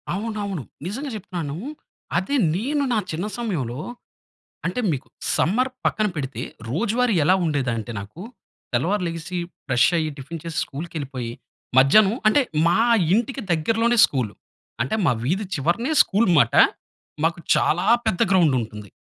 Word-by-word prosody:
అవునవును, 200 - -3 0.2
నిజంగా 265 +10 -4
చెప్తున్నాను, 170 -7 -5 0.6
అది 190 +11 -1 0.2
నేను 280 +8 0
నా - - +2
చిన్న 165 +5 -3
సమయంలో, 150 - -3 0.9
అంటే 185 +8 -1
మీకు 135 - -4 0.3
సమ్మర్ 250 +9 +2
పక్కన 215 -1 +1
పెడితే 135 -2 -4 0.3
రోజువారీ 230 - +1
ఎలా 185 - +5
ఉండేదంటే, 125 -7 -1
నాకు 105 - -11 0.5
తెల్లవారు 180 +11 +1
లెగిసి, 165 +2 -5 0.3
ఫ్రెష్ 125 -2 +4
అయ్యి 155 -1 0
టిఫిన్ 155 +4 -7
చేసి, 165 -2 -6
స్కూల్‌కి 165 +5 -8
వెళ్ళిపోయి, 130 -5 -4 0.5
మధ్యాహ్నం 195 - +6
అంటే 250 +7 +4 0.3
మా 170 - +4 0.4
ఇంటికి 240 +3 -1
దగ్గరలోనే 225 +8 +1
స్కూలు, 125 -7 -3 0.5
అంటే 130 - -2
మా - - +4
వీధి 190 +9 0
చివరనే 175 - 0
స్కూల్ 210 +3 +1
మాట. 120 -4 +3 0.7
మాకు 170 +1 +1 0.2
చాలా 175 +5 +1 0.2
పెద్ద 180 - 0
స్కూల్ 175 -8 +4
ఉంటుంది. 105 -2 -9
175 Hz, 135 wpm, -23 LUFS, 140-215 Hz, 0.9 s, మధ్యాహ్నం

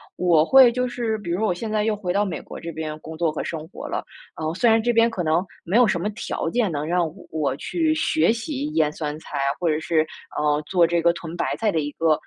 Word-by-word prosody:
我 170 -4 +3
会 260 +3 +7
就 250 +1 -1
是 235 -3 -2
比 175 -5 -6
如 175 - 0
说 220 - +1
我 180 - +1
现 215 +5 -5
在 215 -1 +1
又 220 0 +1
回 185 -4 -3
到 205 +2 +2
美 180 -6 -3
国 - - -10
这 170 - -6
边 155 -1 -5
工 160 0 -9
作 165 -2 +1
和 - - -4
生 160 -1 -5
活 - - -8
了。 - - -3 0.3
呃， 160 0 -2
虽 230 +6 +3
然 225 0 +4
这 240 +1 +1
边 230 +1 +4
可 185 -6 -3
能 160 +3 +2 0.2
没 180 - -2
有 240 -1 +6
什 175 - 0
么 195 - -2
条 210 - -4
件 235 -6 +1
能 150 -1 -2
让 175 +2 +1 0.3
我 150 -4 -1
去 320 - 0
学 315 -5 +2
习 275 +5 -3
腌 150 -1 +2
酸 150 -1 -4
菜 150 - -7
啊， 140 0 +1
或 175 - 0
者 155 0 +1
是， 160 -1 +1 0.3
呃， 150 0 +1
做 175 -3 +4
这 170 0 +1
个 170 +1 +4
屯 170 -1 -7
白 - - -1
菜 220 -2 +1
的 160 - 0
一 145 0 -3
个， 165 -1 +1
175 Hz, 290 characters per minute, -23 LUFS, 160-225 Hz, 0.3 s, 会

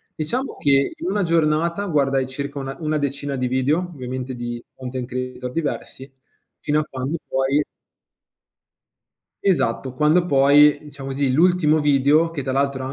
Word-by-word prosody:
Diciamo 240 - -3
che 140 -1 +2
in 180 - -4
una 205 0 0
giornata 165 +3 +1
guardai 135 -6 +1
circa 140 +2 -5
una 135 0 -5
una 155 0 0
decina 140 -1 -3
di 125 - -1
video 130 +6 +1
ovviamente 130 -7 -5
di 120 0 -5
content 130 -1 -5
creator 125 0 -5
diversi 145 -4 -4 0.5
fino 150 +1 +1
a - - 0
quando 135 +5 -4
poi 135 +2 +1 1.8
Esatto, 130 -8 0
quando 155 +5 +3
poi, 145 0 +5
diciamo 140 -2 -9
così, 135 -1 0
l'ultimo 160 0 +3
video, 145 +3 +3
che 145 -4 -4
tra 130 - -3
l'altro 140 -1 0
140 Hz, 145 wpm, -22 LUFS, 130-155 Hz, 1.8 s, poi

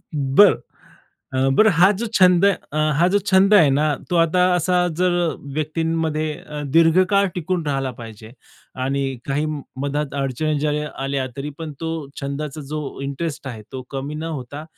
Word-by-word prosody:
बरं. 145 +8 +5 0.8
अ, 130 +1 +2
बरं 220 -1 +6
हा, 175 +4 +5
जो 235 - -1
छंद 180 0 +5
अ, 180 -6 -1 0.2
हा 175 - +4
जो 205 - +4
छंद 195 +2 +5
आहे 160 -9 +6
ना 150 +2 +2 0.2
तो 175 - +1
आता 165 +2 +3
असा 180 +1 +2
जर 180 -1 +2 0.4
व्यक्तींमध्ये 155 0 -1
अ, 150 -1 -7
दीर्घकाळ 185 +4 +4
टिकून 175 -1 -2
राहिला 135 -2 -1
पाहिजे 110 0 -10 0.5
आणि 140 +1 -1 0.2
काही 145 +3 -1 0.4
मधात 145 0 -2
अडचणी 145 +3 -1
ज्या 150 0 0
या 150 0 -3
आल्या 135 -1 -1
तरी 140 +2 -4
पण 160 -2 -6
तो 165 0 -3 0.3
छंदाचा 140 +2 -4
जो 150 -2 -5
इंटरेस्ट 140 +1 -4
आहे, 110 -4 -7
तो 130 -1 -5
कमी 140 +2 -5
न 155 - -5 0.2
होता 140 +5 -8
150 Hz, 160 wpm, -21 LUFS, 140-175 Hz, 0.8 s, बरं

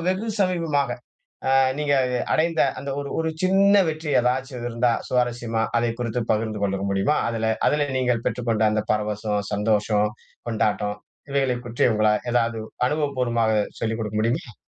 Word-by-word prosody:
வெகு 190 +5 -1
சமீபமாக 165 -8 +1 0.6
அ - - +3 0.3
நீங்க 150 -1 +1 0.2
அ - - 0 0.2
அடைந்த 160 0 +1 0.2
அந்த 140 +2 -5
ஒரு 140 - -5
ஒரு 160 0 0
சின்ன 195 +2 +4
வெற்றி 155 -1 -3
ஏதாச்சும் 125 0 -1
இருந்தா 115 0 +1 0.2
சுவாரஸ்யமா, 120 -2 0
அத 120 0 +2
குறித்து 120 0 -1
பகிர்ந்து 110 -1 -2
கொள்ள 100 -1 0
முடியுமா? 100 +10 +1
அதுல 115 -1 -1 0.2
அதுல 145 -1 +1
நீங்கள் 125 -2 0
பெற்றுக்கொண்ட 115 -3 0
அந்த 105 0 0
பரவசம், 105 -1 -1
சந்தோஷம், 105 0 +1 0.4
கொண்டாட்டம் 105 -2 0 0.3
இவைகளை 135 -2 +1
பற்றிய 120 +1 +2
உங்களா 110 0 +3 0.2
ஏதாவது 115 -1 +1 0.3
அனுபவபூர்வமாக 125 -7 0 0.3
சொல்லிக் 110 0 -1
குடுக்க 105 -1 -3
முடியுமா? 115 +1 -1
120 Hz, 145 wpm, -23 LUFS, 110-140 Hz, 0.6 s, சின்ன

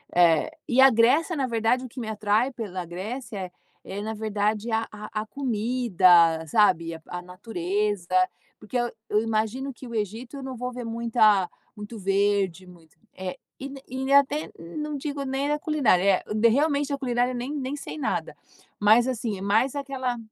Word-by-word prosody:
eh, 170 -3 +4 0.2
e 250 +2 +4
a 270 - +9
Grécia 265 +9 +3
na 275 -3 0
verdade, 230 +2 +1
o - - -8
que 255 - -9
me 230 - -4
atrai 215 +4 +1
pela 195 -7 -5
Grécia 195 +2 -6 0.3
é 195 +1 -6
na 220 +1 -3
verdade 215 +1 -1
a 225 0 0
a 215 0 -5
a - - -14
comida, 205 -10 +3
sabe. 170 -2 +3
A 160 - -11
a 180 - -5
natureza, 185 0 -2 0.4
porque 215 +4 -4
eu 240 0 0 0.2
eu 210 - +3
imagino 225 +5 -1
que 255 - -11
o 235 - -7
Egito 225 +6 -4
eu 275 - -7
não 265 -1 -5
vou 250 +1 -3
ver 245 -1 -6
muita 225 -4 +3 0.3
muito 210 +2 -8
verde, 195 -2 +1
muito, 165 -3 -18 0.2
e 185 -1 -5 0.5
e 265 +2 -3
até, 280 +2 +3 0.3
não 300 -1 -3
digo 285 0 -4
nem 270 +2 -1
a 295 - 0
culinária, 205 - +3 0.3
realmente 285 +2 +1
a - - -1
culinária 245 -1 0
nem 245 +3 -4
nem 275 -1 -3
sei 295 - -7
nada. 280 - -2 0.4
Mas, 220 +4 +5
assim, 230 -5 -2
é - - -9
mais 220 +7 +2
aquela 265 -3 -3
225 Hz, 170 wpm, -25 LUFS, 200-260 Hz, 0.5 s, a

